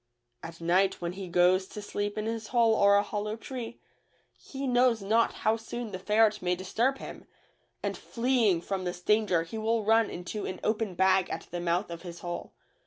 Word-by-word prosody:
At 165 0 -9
night 185 +3 +2
when 170 -1 -3
he 190 0 -7
goes 180 +2 +3
to 210 - -8
sleep 205 0 -3
in 215 - -2
his 225 -1 -3
hole 230 -1 +3
or 200 -2 +5
a 205 - +4
hollow 210 +1 -3
tree, 240 0 -7 0.6
he 275 0 -7
knows 245 -4 +3
not 225 +4 +3
how 220 +1 +4
soon 230 0 -6
the 185 - -5
ferret 215 +2 +3
may 180 0 +1
disturb 230 +9 0
him, - - -9 0.6
and - - -1
fleeing 230 -7 +1
from 190 +1 -3
this 175 0 -4
danger 205 -3 +2
he 195 +7 -6
will 225 0 +1
run 225 +1 +4
into 180 +4 -5
an 185 - -5
open 215 -3 -1
bag 190 0 +3
at - - -5
the 175 - -3
mouth 175 +2 0
of 170 0 -7
his 175 -2 -9
hole. 175 -1 -5
205 Hz, 195 wpm, -29 LUFS, 180-225 Hz, 0.6 s, or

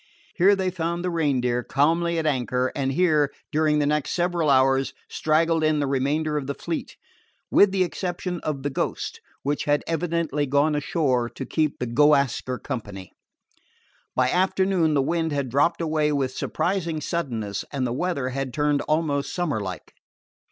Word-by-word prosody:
Here 195 +3 +5
they 190 -1 -1
found 170 0 -2
the 180 - 0
Reindeer 130 -7 +1
calmly 165 +6 +1
at 160 - -1
anchor; 130 -3 0
and 135 -2 0
here, 150 -2 +2 0.2
during 155 0 +2
the 145 - +2
next 150 0 0
several 175 -3 +1
hours, 135 0 +3
straggled 160 +1 +1
in 155 -1 +2
the 145 - +1
remainder 145 +3 0
of 140 -3 -3
the 140 - -3
fleet, 165 +4 -5 0.5
with 200 -1 +6
the 190 -1 +2
exception 180 0 -3
of 145 -4 -4
the 145 - -1
Ghost, - - -3 0.2
which 145 +1 -1
had 145 0 +2
evidently 165 -3 -1
gone 145 +3 +2
ashore 140 -5 0
to 130 +3 -7
keep 155 0 0
the 125 - -2
Go 145 +5 +5
Ask 140 -3 0
Her 130 0 -2
company. 100 -7 -6 1.0
By 130 0 +2
afternoon 185 -3 +2
the 140 - +3
wind 165 +2 0
had 140 -3 -1
dropped 145 +7 +2
away 155 -2 +1
with 135 -3 0
surprising 170 -4 -1
suddenness, 120 - -3
and 135 -3 -1
the 120 - -1
weather 140 -3 -1
had 130 -1 -4
turned 150 -1 +1
almost 150 -2 0
summer 175 -9 -1
like. 100 - -6
150 Hz, 170 wpm, -24 LUFS, 135-165 Hz, 1.0 s, with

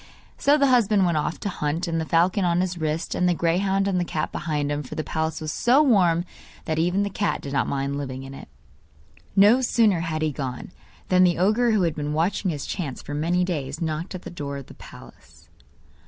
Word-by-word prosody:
So 290 +1 +4
the 280 - +3
husband 210 -5 +3
went 170 -3 +1
off 150 - -3
to - - -3
hunt, 165 -2 -2
with 165 -2 -1
the 160 - -2
falcon 175 +4 +2
on 175 0 +2
his 180 -1 -3
wrist, 155 +1 -2
and 180 0 +1
the 175 - +2
greyhound 190 +4 +1
and 190 -2 +1
the - - +1
cat 155 -3 -3
behind 150 -2 -2
him 145 0 -1
for 130 - -9
the 155 - -2
palace 160 0 -2
was 155 -1 -4
so 260 +5 +4
warm 180 - +3 0.4
that 160 0 -1
even 180 +4 +1
the 200 - -2
cat 205 -1 -1
did 140 - -7
not 140 - +1
mind 140 +1 -2
living 130 -2 -5
in 135 0 -9
it. - - -10 0.9
No 210 +6 +6
sooner 225 -7 +3
had 160 -2 -2
he 155 - +1
gone, 135 +1 -6 0.4
than 185 0 +5
the 175 -2 +3
ogre 215 +7 +2
who 215 -4 +2
had 165 -3 +1
been 150 0 -3
watching 180 +5 0
his 150 -3 -4
chance 150 -9 -4
for 145 - -7
many 170 +5 +1
days, 150 -5 -3
knocked 160 +2 -3
at 185 - -8
the - - -8
door 145 -4 -5
of 140 - -8
the - - -13
palace. - - -15
170 Hz, 230 wpm, -24 LUFS, 150-190 Hz, 0.9 s, No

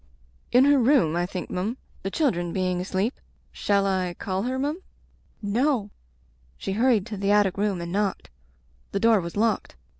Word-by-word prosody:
"In 250 +2 +6
her 285 -1 +5
room, 235 - +3
I 175 0 0
think, 180 -1 -6
m'm; 205 +8 -2 0.2
the 195 - -3
children 180 - 0
being 185 -1 -1
asleep. 190 +6 -2 0.3
Shall 200 -1 +1
I 185 -2 0
call 190 0 -2
her, 255 +4 -2
m'm 295 +7 -2 0.4
?" - - -37
"No!" 225 0 +1 0.7
She - - -4
hurried 225 -1 +3
to 215 -2 -6
the 200 +1 -1
attic 205 -2 +3
room 200 -2 0
and 170 0 -5
knocked. 200 0 -1 0.6
The 200 - +1
door 225 -2 +4
was 170 +3 -6
locked. 225 +1 0
200 Hz, 175 wpm, -25 LUFS, 185-235 Hz, 0.7 s, In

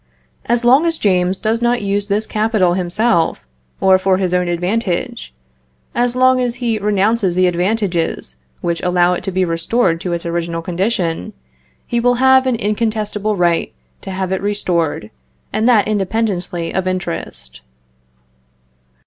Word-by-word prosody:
As 240 0 +1
long 270 +7 +5
as 330 -1 0
James 185 -4 +1
does 225 +1 0
not 240 -1 +1
use 200 0 -1
this 210 +2 0
capital 215 -5 +1
himself, 185 +1 0 0.3
or 190 -1 +4
for 190 0 +2
his 185 -2 -1
own 180 0 +1
advantage 175 - -2 0.6
as 240 0 +1
long 255 0 +4
as 245 -1 -1
he 235 -3 -1
renounces 205 -1 +1
the 185 0 +3
advantages 180 - -1 0.3
which 170 -1 -2
allow 180 0 +2
it 180 - -4
to 195 - -2
be 185 0 +1
restored 165 +1 0
to 180 - -3
its 170 0 -4
original 170 0 -3
condition 180 - -2 0.5
he 235 - -1
will 245 +1 +2
have 260 +1 +4
an 255 - +2
incontestable 215 -1 -1
right 175 -2 +1 0.3
to - - -8
have 190 -1 -3
it 190 - -1
restored, 175 - -1 0.4
and 220 +3 +2
that 215 -5 +4
independently 195 -4 -2
of 185 0 -1
interest. 65 - -5
195 Hz, 150 wpm, -17 LUFS, 175-225 Hz, 0.6 s, long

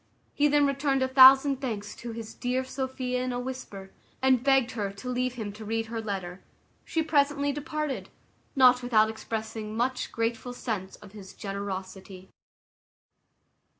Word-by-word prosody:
He 290 - +3
then 290 0 +4
returned 275 -1 +1
a - - +1
thousand 270 +1 +7
thanks 210 -6 -4
to 235 - -7
his 225 -1 -7
dear 250 +1 -1
Sophia 260 -1 -3
in 255 - -2
a 245 - -2
whisper, 245 -7 -7 0.3
and 260 -2 +3
begged 270 -3 +3
her 205 -4 -3
to 200 +6 -8
leave 250 0 -1
him 215 -4 -5
to 215 +1 -10
read 225 +1 -2
her 225 0 -5
letter: 190 -4 -5 0.4
she 325 - -1
presently 285 -2 +2
departed, 295 0 -4 0.5
not 255 -2 +6
without 220 -3 +3
expressing 220 -1 -5
much 250 +2 -1
grateful 230 +2 -2
sense 210 -6 -4
of 210 -2 -15
his 195 -3 -12
generosity. 190 -1 -6
245 Hz, 150 wpm, -27 LUFS, 215-265 Hz, 0.5 s, thousand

